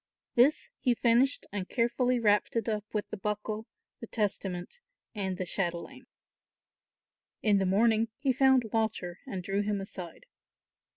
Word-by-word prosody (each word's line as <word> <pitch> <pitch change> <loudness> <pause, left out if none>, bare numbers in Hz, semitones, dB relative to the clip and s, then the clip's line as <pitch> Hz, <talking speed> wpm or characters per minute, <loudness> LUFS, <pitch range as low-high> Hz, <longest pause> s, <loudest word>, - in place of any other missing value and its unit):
This 260 +6 +3
he 245 -3 +2
finished 245 +4 +3
and 195 -2 -4
carefully 245 +1 +1
wrapped 210 -1 +2
it 230 -1 0
up 215 -2 -1
with 210 -1 -2
the - - -4
buckle, 210 +2 -3 0.3
the 230 - -8
testament 195 - -2 0.3
and 190 -4 -2
the 185 - -2
chatelaine. 185 +9 -3 1.4
In 205 -2 +4
the 190 - +1
morning 220 +3 +3
he 275 -2 +1
found 265 -4 +4
Walter 215 -6 -1
and 185 -2 -4
drew 195 +2 0
him 205 -1 -1
aside. 185 - -7
215 Hz, 140 wpm, -30 LUFS, 195-235 Hz, 1.4 s, In